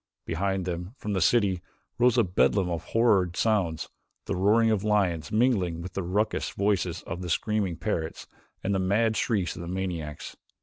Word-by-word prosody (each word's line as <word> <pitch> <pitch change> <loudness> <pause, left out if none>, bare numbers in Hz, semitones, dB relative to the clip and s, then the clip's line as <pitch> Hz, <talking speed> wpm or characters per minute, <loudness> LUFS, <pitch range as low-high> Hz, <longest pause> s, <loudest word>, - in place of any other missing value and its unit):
Behind 95 +2 -1
them, 90 +5 -4
from 105 - -4
the 95 - 0
city, 95 -1 +3 0.4
rose 125 +1 +4
a 120 - +5
bedlam 90 0 +2
of 85 - -3
horrid 100 -7 +2
sounds, 95 -8 +1 0.4
the - - -2
roaring 110 +5 +4
of 105 -2 0
lions 95 -7 +1
mingling 105 -8 +2
with 90 +1 -7
the 95 - -2
raucous 100 +5 0
voices 95 -4 -1
of 85 +2 -6
the 90 - -5
screaming 105 0 0
parrots 80 -7 -3 0.4
and 100 - 0
the 95 - +1
mad 110 +4 +2
shrieks 100 -8 0
of - - -7
the 85 - -6
maniacs. 85 -5 -4
95 Hz, 175 wpm, -27 LUFS, 85-105 Hz, 0.4 s, a